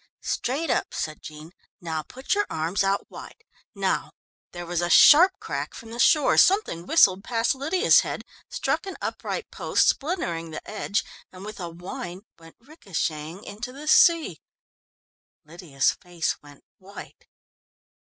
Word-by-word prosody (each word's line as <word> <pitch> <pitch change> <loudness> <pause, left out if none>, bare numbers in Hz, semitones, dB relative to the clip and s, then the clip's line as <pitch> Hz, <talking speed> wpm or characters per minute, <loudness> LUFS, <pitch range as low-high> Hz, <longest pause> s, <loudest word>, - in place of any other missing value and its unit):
"Straight 280 +5 -2
up," - - -1
said 155 -1 -4
Jean. 155 +2 -11 0.3
"Now 160 -4 -4
put 260 - -14
both - - +2
your 410 0 0
arms 165 +5 -1
out 195 +1 0
wide. 450 - -12 0.3
Now - - -1 0.2
" - - -81
There 175 0 -7
was 175 0 -2
a 175 - -1
sharp 335 - +8
crack - - -5
from 225 0 -11
the 235 - -8
shore; 300 +2 +4
something 370 - +2
whistled 195 - +4
past 230 -1 0
Lydia's 320 - +3
head, - - -4 0.3
struck - - -2
an 385 - -6
upright 470 - -5
post, - - +1
splintering 180 - -1
the 155 - -8
edge, 210 -1 -2 0.3
and 185 +1 -11
with 215 -1 -8
a 175 -2 -5
whine 175 +1 -8 0.2
went 165 0 -16
ricochetting 185 - -5
into 220 +5 -7
the 285 +4 -10
sea. 320 - +4 1.0
Lydia's 155 -4 -1
face 175 -2 -3
went 145 -1 -17 0.2
white. 195 +2 -13
195 Hz, 155 wpm, -25 LUFS, 165-280 Hz, 1.0 s, sharp